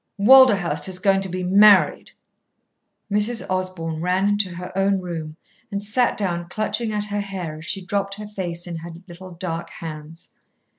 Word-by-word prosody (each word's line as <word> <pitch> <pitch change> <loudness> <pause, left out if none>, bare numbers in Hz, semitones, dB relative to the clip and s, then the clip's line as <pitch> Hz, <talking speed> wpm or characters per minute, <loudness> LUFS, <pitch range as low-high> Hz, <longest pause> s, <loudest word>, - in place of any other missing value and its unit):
"Walderhurst 210 -6 +5
is 185 - -4
going 195 +1 +2
to 190 - -2
be 185 +1 -4
married!" 200 +2 +5 1.0
Mrs. 210 +3 +2
Osborn 185 -4 -3
ran 185 +3 +1
into 205 -2 0
her 180 +1 -8
own 195 0 +2
room 165 -4 -6 0.3
and 200 -1 -4
sat 240 +4 +1
down 175 -4 -2
clutching 215 +5 -2
at 210 -1 -1
her 205 0 -3
hair 180 -6 -6
as 160 - -11
she 190 +1 -5
dropped 200 0 -2
her 210 0 -8
face 175 -4 -5
in 170 -2 -6
her 165 +1 -8 0.2
little 180 +1 -11
dark 170 -1 -5
hands. 160 0 -10
190 Hz, 165 wpm, -22 LUFS, 170-205 Hz, 1.0 s, Walderhurst